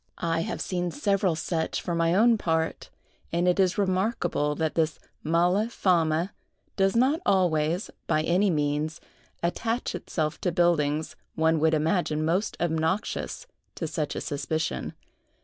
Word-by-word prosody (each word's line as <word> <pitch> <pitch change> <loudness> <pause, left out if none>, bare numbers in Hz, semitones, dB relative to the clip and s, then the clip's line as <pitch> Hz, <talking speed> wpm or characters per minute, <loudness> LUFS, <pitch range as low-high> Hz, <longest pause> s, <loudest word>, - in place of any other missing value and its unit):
I 165 -1 0
have 165 - -3
seen 180 -1 -1
several 195 - +1
such, 160 0 -2
for 175 - -3
my 165 +1 +2
own 230 +3 +5
part; 160 -5 -1 0.4
and 175 +1 +1
it 180 +2 +2
is 185 -2 +3
remarkable 185 -6 0
that 160 +1 -1
this 160 -1 0 0.2
mala 175 +7 +2
fama 170 -4 +1 0.4
does 195 +1 +2
not 265 +7 +3
always, 175 -2 +1 0.2
by 155 - +2
any 185 +5 +2
means, 150 -1 -1 0.4
attach 225 +7 -1
itself 155 -2 -3
to 180 - 0
buildings 160 -3 +1 0.2
one 160 0 +2
would 160 +1 +3
imagine 155 -1 0
most 185 +6 0
obnoxious 170 - -1 0.3
to 165 - -3
such 155 -1 -3
a - - -3
suspicion. 155 +2 -2
170 Hz, 140 wpm, -27 LUFS, 160-190 Hz, 0.4 s, own